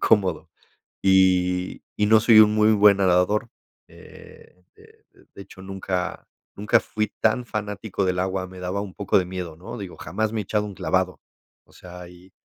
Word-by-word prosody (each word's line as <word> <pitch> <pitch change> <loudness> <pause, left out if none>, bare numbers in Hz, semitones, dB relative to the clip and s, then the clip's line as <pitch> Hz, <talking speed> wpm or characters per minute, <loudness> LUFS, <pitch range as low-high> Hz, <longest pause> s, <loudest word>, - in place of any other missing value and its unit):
cómodo. 100 -4 +1 0.6
Y 90 -1 +2 0.2
y 105 - +2
no 110 0 +6
soy 110 0 +6
un 105 0 +6
muy 110 0 +4
buen 100 -1 +5
nadador, 95 +4 +1 0.4
eh, 90 - -17
de - - -22
de - - -24
de 100 - -10
hecho, 95 - -14
nunca 95 -1 -5 0.3
nunca 105 +1 +2
fui 110 -1 -3
tan 120 +3 +1
fanático 105 -2 -4
del 90 -1 -1
agua, 95 0 -2
me 95 0 -12
daba 90 +2 -3
un 100 -3 -8
poco 100 -1 0
de 90 - +1
miedo, 90 -3 -6
¿no? 115 +8 -9
Digo, 95 -4 -8
jamás 110 0 -3
me 110 - -1
he - - -6
echado 105 +2 -1
un 100 - -8
clavado. - - -1 0.5
O - - -26
sea, 90 -1 -12
y, 90 +1 -18
95 Hz, 185 wpm, -23 LUFS, 90-105 Hz, 0.6 s, no